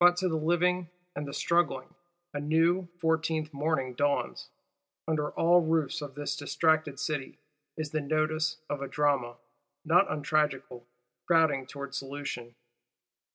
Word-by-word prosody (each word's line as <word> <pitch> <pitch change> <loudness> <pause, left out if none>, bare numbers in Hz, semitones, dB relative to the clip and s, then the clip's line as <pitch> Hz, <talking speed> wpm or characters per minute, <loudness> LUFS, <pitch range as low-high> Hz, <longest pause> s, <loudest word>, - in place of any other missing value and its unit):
But, 175 0 +7
to 185 - +1
the 165 - 0
living 175 +2 +1 0.3
and 145 0 -4
the - - -5
struggling, 150 +1 0 0.4
a 145 - -2
new, 165 +5 +2
Fourteenth 160 -2 0
morning 140 -3 -1
dawns. 145 +3 -1 0.6
Under 150 -2 0
all 175 +1 +5
roofs 160 -1 0
of 140 -2 -7
this 145 0 -3
distracted 155 -1 +1
City, 150 -3 -3 0.4
is 155 -2 -3
the 155 - 0
nodus 155 +1 0
of 145 -1 -3
a 140 - -3
drama, 140 -5 +1 0.5
not - - +5
untragical, 145 -5 -1 0.4
crowding 155 -6 +3
towards 140 -1 -6
solution. 135 -4 -6
155 Hz, 135 wpm, -29 LUFS, 140-160 Hz, 0.6 s, But